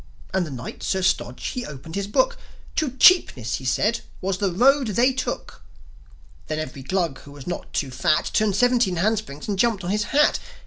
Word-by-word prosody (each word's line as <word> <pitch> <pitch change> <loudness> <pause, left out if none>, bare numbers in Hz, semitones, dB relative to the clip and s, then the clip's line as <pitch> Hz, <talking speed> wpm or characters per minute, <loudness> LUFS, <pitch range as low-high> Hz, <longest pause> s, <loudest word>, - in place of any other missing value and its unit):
And 185 -3 +1
the - - -7
Knight, 125 -3 -7
Sir 190 -1 -1
Stodge, 125 -8 0
he 250 - -4
opened 150 - -9
his 200 +1 -2
Book: - - +2 0.4
"To 310 -3 +1
Cheapness," 135 - +5
he 130 - -10
said, 210 - +1 0.2
"was 185 0 -2
the 195 -2 +1
road 265 +7 +4
they 240 +5 +2
took." 260 - -4 0.9
Then 155 - -2
every 140 -3 -5
Glug 170 -1 -1
who 140 - -14
was 140 -2 -11
not 175 - -5
too 135 -3 -2
fat 155 +5 +1
Turned 210 -3 +2
seventeen 245 -4 +3
handsprings, 195 -6 -1
and 200 -3 -2
jumped 225 -4 +2
on 175 - -2
his 210 0 0
hat. 295 +5 +3
190 Hz, 190 wpm, -23 LUFS, 155-235 Hz, 0.9 s, Cheapness